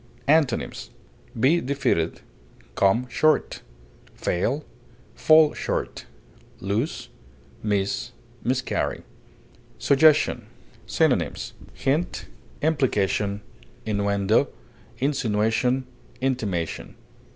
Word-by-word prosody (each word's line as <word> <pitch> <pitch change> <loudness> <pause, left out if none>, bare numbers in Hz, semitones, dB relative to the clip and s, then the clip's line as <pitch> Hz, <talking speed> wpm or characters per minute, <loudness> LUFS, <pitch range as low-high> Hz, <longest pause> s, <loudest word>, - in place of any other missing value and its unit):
Antonyms: 140 - +1 0.5
be 155 +8 +4
defeated, 125 - 0 0.5
come 105 - +2
short, 155 +5 +1 0.5
fail, 130 - -1 0.5
fall 155 -1 +5
short, - - -3 0.5
lose, 105 - -2 0.5
miss, 100 -2 -1 0.3
miscarry. - - -1 0.7
SUGGESTION. 150 +2 +4 0.4
Synonyms: - - 0 0.2
hint, 150 +6 -1 0.4
implication, 105 -9 +1 0.4
innuendo, 100 0 +2 0.5
insinuation, 125 -1 +1 0.3
intimation. 105 -11 -2
125 Hz, 60 wpm, -24 LUFS, 100-145 Hz, 0.7 s, fall